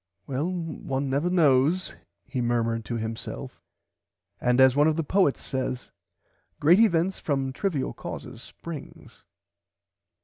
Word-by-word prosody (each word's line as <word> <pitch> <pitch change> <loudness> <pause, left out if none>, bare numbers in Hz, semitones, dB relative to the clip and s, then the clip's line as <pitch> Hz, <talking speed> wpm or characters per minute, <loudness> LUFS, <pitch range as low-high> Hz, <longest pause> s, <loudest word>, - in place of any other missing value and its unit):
Well 145 +6 -2
one 145 -6 -3
never 145 +6 +1
knows 160 +1 +3 0.3
he 130 - -3
murmerd 115 -1 0
to 120 - -3
himself 110 0 -6 0.8
and 125 +1 +2
as 130 -1 +6
one 145 +1 +5
of 160 - +2
the 165 - -1
poets 185 -2 +2
says 130 -1 -3 0.7
great 170 +7 +6
events 190 -4 +3
from 135 -3 -1
trivil 150 -4 -1
causes - - -8
springs. 165 -4 -10
140 Hz, 125 wpm, -26 LUFS, 130-170 Hz, 0.8 s, as